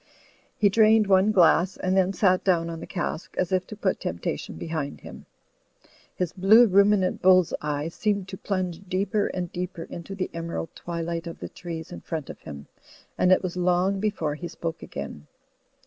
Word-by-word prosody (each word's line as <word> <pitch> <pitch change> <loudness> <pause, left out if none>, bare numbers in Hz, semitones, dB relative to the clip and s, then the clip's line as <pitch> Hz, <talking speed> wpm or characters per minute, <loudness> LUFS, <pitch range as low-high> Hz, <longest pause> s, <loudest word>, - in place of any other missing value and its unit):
He 210 - +4
drained 215 +1 +5
one 195 +1 +4
glass 180 -1 +4
and 185 0 0
then 190 0 +3
sat 185 -2 +2
down 170 -3 +1
on 165 - -6
the - - -8
cask, 175 -2 -4
as 185 0 0
if 185 -1 0
to 215 - -8
put 200 -2 -1
temptation 85 +1 -4
behind 150 - -4
him. - - -11 0.9
His 180 -3 -2
blue 210 +6 +6
ruminant 200 -2 +3
bull's 185 -1 +5
eye 150 0 -2
seemed 200 +1 -1
to 190 - -6
pltmge 185 -2 -3
deeper 200 +3 0
and 180 -2 -4
deeper 180 -1 -5
into 175 +3 -8
the 185 -1 -3
emerald 165 -1 -4
twilight 170 0 -4
of 170 - -7
the - - -7
trees 165 -1 -7
in 175 - -8
front 160 -5 -5
of - - -13
him, 70 -2 -9 0.5
and 180 - +3
it 185 - +4
was 185 -1 -3
long 180 +2 +1
before 190 -8 -1
he 175 +4 -6
spoke 165 -1 -5
again. 70 +1 -7
180 Hz, 180 wpm, -25 LUFS, 165-195 Hz, 0.9 s, blue